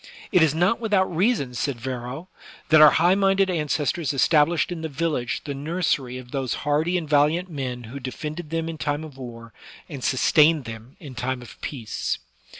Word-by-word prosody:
It 180 - +4
is 155 -2 +3
not 180 +8 +2
without 200 -6 +1
reason, 180 - +1
said 125 0 -2
Varro, 125 +6 -5 0.4
that 155 -1 +7
our 155 - +10
high 175 +5 +4
minded 195 -1 +2
ancestors 150 -1 -1
established 150 +7 +3
in 170 -2 -4
the 160 - -4
village 140 -5 -2
the 145 - -4
nursery 140 -4 -1
of 125 -1 -11
those 135 -4 -2
hardy 155 +5 +1
and 165 -3 -4
valiant 155 +5 +2
men 130 -4 -4
who 120 +5 -8
defended 150 +5 -6
them 165 0 -2
in 165 -1 -6
time 145 +1 -2
of 155 -4 -10
war 115 -2 -9 0.3
and 140 -6 -8
sustained 150 +2 +4
them 115 +3 -9
in 145 -5 -10
time 125 0 -3
of 100 -4 -14
peace. 115 -7 -3
150 Hz, 180 wpm, -24 LUFS, 130-165 Hz, 0.4 s, our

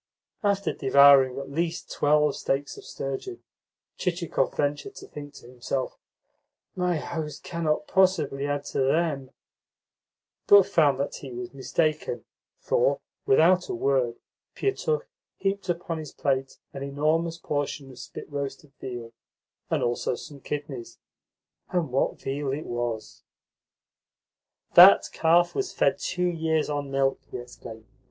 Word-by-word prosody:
After 200 -3 +1
devouring 135 -1 +6
at 140 0 -6
least 165 +3 -2
twelve 150 0 +3
steaks 140 +1 -2
of - - -11
sturgeon, 135 - -5 0.6
Chichikov 170 -6 -1
ventured 145 0 -1
to - - -10
think 145 -1 -9
to - - -13
himself, 125 +1 -3 0.8
"My 180 -2 +1
host 155 -1 -5
cannot 155 -3 -1
possibly 155 -7 +2
add 145 0 -1
to - - 0
THEM," 140 -1 +1 1.2
but 200 -1 +9
found 145 -5 +3
that 140 - -2
he 135 - -9
was 120 +1 -6
mistaken, 150 -2 -1 0.3
for, - - +1 0.3
without 175 +6 +4
a - - -2
word, 125 -1 +1 0.4
Pietukh 460 +4 -1 0.3
heaped 195 -1 -2
upon 170 -1 -2
his 155 -3 -7
plate 135 -1 -1 0.2
an 135 - -7
enormous 155 +4 0
portion 145 -3 -3
of 125 - -13
spit - - -9
roasted 140 0 -5
veal, 120 -2 -6 0.6
and - - +1
also 120 +1 0
some 145 +2 -10
kidneys. 145 -3 -6 0.7
And 170 -7 -1
what 130 - 0
veal 135 0 -3
it 150 +3 -4
was! 120 -2 -4 1.5
"That - - +9
calf 170 +2 +3
was 395 -1 -2
fed - - +1
two 180 -1 -1
years 160 -3 0
on 145 -1 -3
milk," 135 0 +1
he - - -5
explained. 120 -2 -10
145 Hz, 130 wpm, -26 LUFS, 135-165 Hz, 1.5 s, but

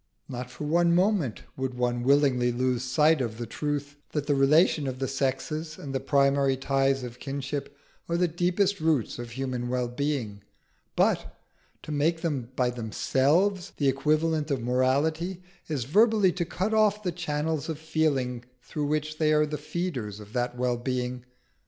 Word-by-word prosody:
Not 125 0 -6
for 125 - -8
one 170 +3 +3
moment 180 - +1
would 130 -1 -3
one 120 -1 0
willingly 130 -2 +3
lose 125 0 0
sight 150 +4 +3
of 115 -3 -3
the 120 - -4
truth 145 +3 -3 0.2
that 150 -2 -1
the 145 - +2
relation 145 +2 +4
of 130 -1 -3
the 135 0 -2
sexes 150 +4 -2
and 140 -2 -7
the 135 - 0
primary 140 0 +2
ties 135 0 +1
of 120 0 -8
kinship 140 +1 -4 0.3
are 170 - +1
the 180 0 +3
deepest 180 +4 +1
roots 155 -8 0
of 120 -1 -6
human 125 0 -3
wellbeing, 125 -3 -2 0.5
but - - +1 0.5
to - - -7
make 160 +3 +1
them 140 -8 -2
by 125 -1 +1
themselves 145 - +1
the 140 -2 +3
equivalent 155 +3 +1
of 135 -5 -1
morality 155 +9 +1 0.2
is 145 -6 -2
verbally 205 - +4
to 175 0 -2
cut 190 +5 -2
off 210 -1 +3
the 180 - 0
channels 160 -2 -2
of 160 - -2
feeling 145 -6 0 0.2
through 150 +2 -3
which 155 +1 -2
they 155 -1 +3
are 150 0 +4
the 150 0 -4
feeders 145 - -4
of 105 +1 -12
that 125 0 -1
wellbeing. 125 0 -2
140 Hz, 165 wpm, -27 LUFS, 125-160 Hz, 0.5 s, relation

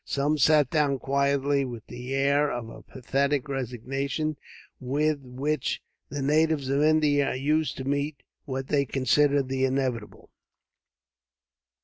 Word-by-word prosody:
Some 145 +2 0
sat 150 0 +4
down 145 -3 +2
quietly, 140 +1 +1
with 120 -4 -7
the 125 +1 -8
air 140 +2 +2
of 115 -2 -5
apathetic 135 +3 -2
resignation, 135 +4 -3 0.4
with 145 +3 0
which 135 +3 -2 0.3
the 140 +1 -4
natives 155 -1 +2
of 140 +1 +2
India 150 -2 +3
are - - -1
used 150 +4 0
to 130 - -4
meet 140 +2 -2 0.2
what 135 -2 -4
they 140 -1 +3
consider 140 +2 +2
the 130 0 -2
inevitable. 130 -4 -2
140 Hz, 125 wpm, -26 LUFS, 130-145 Hz, 0.4 s, sat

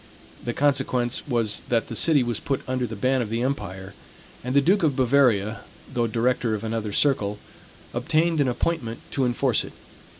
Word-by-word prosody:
The 120 - -2
consequence 130 -3 +1
was 115 -5 +1
that 115 -2 +1
the - - -6
city 150 -5 +4
was 120 -3 -2
put 135 -2 -3
under 130 -1 -1
the 110 - -6
ban 130 +5 +1
of 110 - -3
the 115 +2 -1
empire, 95 -8 -4 0.5
and 125 +2 -3
the - - +7
Duke 185 +8 +3
of 150 -5 +2
Bavaria, 120 -5 +3 0.3
though 120 -1 +1
director 115 0 0
of 105 - -6
another 110 -1 -2
circle, 105 -5 +1 0.6
obtained 155 +5 +1
an 140 - +2
appointment 120 -3 -2
to 135 - +1
enforce 120 0 +1
it. - - -10
125 Hz, 175 wpm, -24 LUFS, 115-140 Hz, 0.6 s, the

